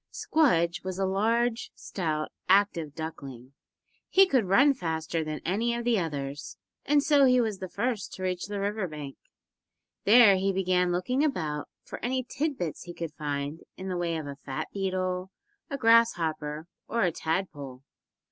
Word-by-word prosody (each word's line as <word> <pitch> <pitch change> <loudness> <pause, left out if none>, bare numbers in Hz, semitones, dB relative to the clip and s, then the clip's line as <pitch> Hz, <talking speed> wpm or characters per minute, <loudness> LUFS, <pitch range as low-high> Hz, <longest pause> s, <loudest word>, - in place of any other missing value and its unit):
Squdge 175 - +2
was 185 0 -4
a 195 - +1
large, 225 +5 +1
stout, 155 -5 -3 0.2
active 185 -7 +3
duckling. 135 -5 -7 0.6
He 390 0 +6
could 260 - +2
run 245 +10 +5
faster 160 -6 -2
than 155 -1 -5
any 225 +7 0
of 235 0 -4
the 235 -3 +3
others, 145 -4 -5 0.3
and 290 0 +4
so 285 -2 +5
he 250 -1 +5
was 220 -5 -1
the 185 - -6
first 235 0 -2
to 185 - -7
reach 180 -1 -2
the 205 -1 -4
river 200 0 -1
bank. 150 -3 -7 0.9
There 215 -2 +7
he 195 +1 +1
began 185 -1 +1
looking 250 +11 0
about 155 - -2
for - - -9
any 255 +2 0
tid 280 +3 -2
bits 170 -1 -4
he 175 -1 -9
could 165 -3 -5
find 145 0 -3 0.2
in 190 0 -6
the 185 - -2
way 170 -2 -1
of 155 - -5
a 140 -1 -7
fat 135 -2 -5
beetle, 185 -1 -2 0.4
a 280 - -3
grass 230 -1 +5
hopper 155 -2 -3 0.2
or 230 -2 0
a 180 - +2
tadpole. 150 -6 -4
185 Hz, 170 wpm, -28 LUFS, 160-230 Hz, 0.9 s, There